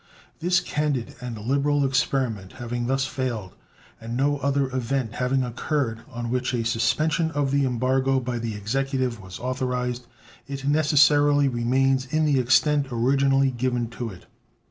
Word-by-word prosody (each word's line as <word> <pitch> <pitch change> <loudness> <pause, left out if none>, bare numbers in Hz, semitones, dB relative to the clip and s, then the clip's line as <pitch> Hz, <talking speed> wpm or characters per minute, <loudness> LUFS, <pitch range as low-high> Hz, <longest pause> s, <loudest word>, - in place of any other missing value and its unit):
This 180 +2 +2
candid 150 -7 -2
and 125 -2 -5
liberal 140 +5 +1
experiment 130 -7 -1
having 120 -1 -4
thus 135 +1 +1
failed, 120 -8 -4 0.5
and 115 +1 -5
no 145 +2 +1
other 140 -2 0
event 125 -2 -1
having 130 +1 0
occurred 125 -1 -2
on 120 -1 -5
which 125 0 0
a 115 -1 -1
suspension 145 +8 +1
of 145 -3 -1
the 140 0 +2
embargo 130 +2 +1
by 125 -1 -3
the 115 -2 -4
Executive 130 +2 -2
was 95 0 -9
authorized, 125 -1 -2 0.4
it 135 0 -6
necessarily 145 -1 +4
remains 130 +2 +1
in 155 +3 +1
the 145 -3 +3
extent 140 +3 +3
originally 135 +3 +2
given 120 -1 -1
to 120 -1 -5
it. 90 -4 -12
130 Hz, 145 wpm, -24 LUFS, 120-140 Hz, 0.5 s, necessarily